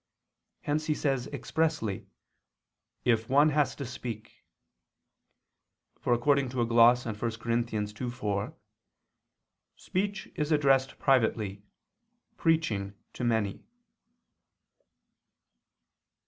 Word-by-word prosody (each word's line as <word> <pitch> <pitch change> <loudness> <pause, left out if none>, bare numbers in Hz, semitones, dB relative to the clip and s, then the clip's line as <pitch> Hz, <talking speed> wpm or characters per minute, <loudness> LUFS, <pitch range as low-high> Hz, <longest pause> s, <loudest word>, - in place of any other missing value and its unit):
Hence 155 +2 -1
he 155 - +1
says 135 -4 -1
expressly: 155 -14 -2 1.0
"If 115 -2 +2
one 145 +3 +5
has 145 -3 +1
to 140 - -5
speak." 115 -3 -8 1.6
For - - -2
according 135 +2 +3
to 125 -1 -2
a - - +3
gloss 120 +1 +5
on 115 - -2
1 105 - -14 0.2
Cor. 115 +1 -4
2:4, 110 -2 -2 1.2
"Speech 200 +1 -3
is 150 +1 -2
addressed 135 -3 +3
privately, 110 -6 +1 0.7
preaching 110 -12 0 0.2
to - - -5
many." 110 -4 0
125 Hz, 90 wpm, -29 LUFS, 110-145 Hz, 1.6 s, one